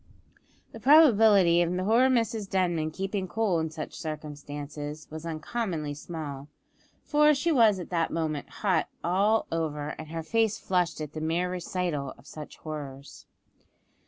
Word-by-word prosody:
The 225 - -10
probability 220 - +6
of 170 - +1
poor 220 +8 +3
Mrs 225 -5 0
Denman 175 -4 +1
keeping 195 +3 -3
cool 205 -4 +1
in 160 0 -1
such 155 -1 -7
circumstances 150 -1 -6
was 160 +1 -6
uncommonly 160 -2 -3
small; 145 -2 -7 0.6
for 300 0 +4
she 335 +5 0
was 225 -8 +5
at 180 - -8
that 165 -2 +1
moment 155 -3 -2
hot 185 -6 0
all 200 +5 +2
over, 150 -3 -2
and 160 - -7
her 165 +1 -5
face 225 +4 +1
flushed 180 -6 0
at 150 0 -6
the 155 - -5
mere 170 +3 0
recital 175 -6 -3
of - - -19
such 150 -1 -10
horrors! 140 -3 -8
170 Hz, 145 wpm, -28 LUFS, 155-210 Hz, 0.6 s, probability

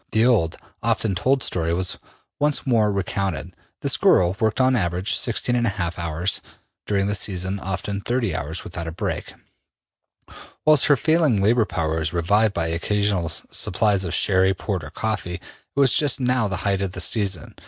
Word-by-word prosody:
The 110 +1 +4
old, 105 -10 +2 0.2
often 110 -2 0
told 130 +8 +1
story 85 -2 -1
was 90 0 -2 0.4
once 150 0 +1
more 110 -5 +2
recounted. 95 -2 -2 0.3
This - - +2
girl 90 0 +3
worked, 110 +1 0
on 130 0 +4
an 115 - +2
average, 90 +4 -1
16 120 +1 0
1/2 95 -8 -1
hours, 85 +2 0 0.5
during 100 -1 +1
the 100 - 0
season 95 -1 -2
often 95 +2 -3
30 120 -6 -1
hours, 80 +3 -3
without 85 -1 -5
a - - -4
break, 80 - -4 1.3
whilst 155 -3 +5
her 145 - +6
failing 155 -5 +2
labor 110 +3 +3
power 80 -4 -2
was 80 +1 -2
revived 100 +5 +2
by 85 - 0
occasional 95 +1 0
supplies 100 +4 0
of 90 - -2
sherry, 95 -1 +3
port, 95 -3 -3
or 70 - -8
coffee. 100 0 -3
It - - -8 0.4
was 135 -3 +4
just 145 -4 +2
now 125 -3 +2
the 95 0 -3
height 100 -1 +1
of 95 -2 -3
the 90 - -4
season. 95 -4 -1
100 Hz, 175 wpm, -22 LUFS, 90-115 Hz, 1.3 s, her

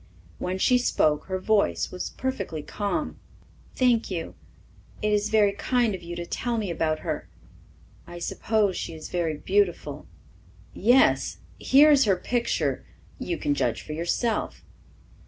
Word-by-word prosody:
When 185 +1 -2
she 250 +6 +3
spoke 155 -10 +1
her 190 -1 -2
voice 205 +2 +1
was 180 - -4
perfectly 260 - -4
calm. 210 - -3 0.6
"Thank 245 -3 +2
you, 170 -4 -4 0.7
it 210 0 0
is 210 0 +1
very 210 -2 +4
kind 240 +1 0
of 190 - -6
you 175 0 -7
to 170 0 -5
tell 235 +6 -2
me 205 -5 -2
about 155 -1 -1
her. - - -4 0.8
I 175 0 -9
suppose 205 +2 0
she 165 - -5
is 155 - -9
very 165 -4 -1
beautiful." 175 -6 0 0.7
"Yes, 245 +6 +3 0.2
here 290 +3 +6
is 275 -4 +5
her 195 -3 +3
picture. 235 +5 -1 0.4
You 345 - -3
can 295 -2 0
judge - - -1
for 150 - -7
yourself." 175 +8 -2
205 Hz, 145 wpm, -26 LUFS, 175-240 Hz, 0.8 s, here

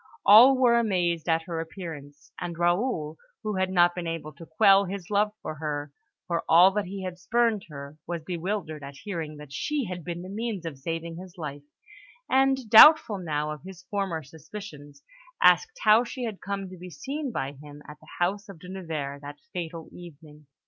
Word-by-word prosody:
All 245 +6 +9
were 240 -2 +4
amazed 175 -7 0
at 165 0 +2
her 165 -1 -4
appearance; 160 -4 -9
and 170 -2 -5
Raoul, 175 -3 0 0.3
who 210 -2 -2
had 190 0 +1
not 175 -1 +4
been 175 -1 -5
able 165 -2 -5
to 165 +4 -13
quell 200 -2 +5
his 190 0 -7
love 210 +1 +2
for 155 - -4
her, 145 -2 -5 0.3
for 170 -1 -2
all 175 +4 +7
that 210 +1 -1
he 190 +1 -6
had 180 -1 -6
spurned 230 0 +1
her, 140 0 -9
was 170 -2 -4
bewildered 175 -2 -4
at 140 - -9
hearing 165 -7 -5
that 150 -2 -11
she 295 - -2
had 180 -3 -6
been 175 +1 -5
the - - -8
means 205 -2 -4
of 150 -5 -6
saving 165 +3 -5
his 185 +1 -11
life, 145 -3 -6 0.7
and, 265 -2 +2
doubtful 225 -1 +8
now 150 -3 -2
of 150 - -7
his 185 -1 -11
former 195 -6 -2
suspicions, 150 -1 -11 0.4
asked 460 +1 +4
how 215 +3 +6
she 250 +1 -6
had 220 -4 -5
come 195 0 -4
to 185 - -11
be 180 +1 -9
seen 275 - -5
by 135 -10 -3
him 145 +1 -13
at 150 0 -11
the - - -18
house 200 +4 -1
of 195 - -10
De 180 +2 -12
Nevers 155 -7 -5
that 145 0 -9 0.2
fatal 165 -2 -5
evening. 150 -3 -13
175 Hz, 190 wpm, -26 LUFS, 155-200 Hz, 0.7 s, All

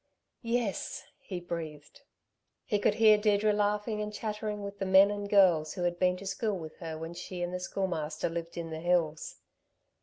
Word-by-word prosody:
"Yes," 235 -4 -2 0.2
he 185 -3 -6
breathed. 160 - -7 0.6
He 205 - 0
could 205 +1 +2
hear 215 -1 +6
Deirdre 210 0 +3
laughing 210 +1 0
and 210 0 -3
chattering 210 -1 -4
with 200 0 -7
the 195 - -1
men 190 +2 +7
and 205 0 -4
girls 180 -6 +4
who 180 - -3
had 175 0 0
been 180 0 +3
to 195 - -10
school 200 +1 -1
with 160 -2 -9
her 160 -2 -6
when 165 +1 -6
she 175 +1 -6
and 175 +1 -3
the 180 - -2
Schoolmaster 165 -5 -2
lived 170 0 -5
in 165 -1 -4
the 160 - -4
hills. 165 -2 0
190 Hz, 185 wpm, -30 LUFS, 170-210 Hz, 0.6 s, men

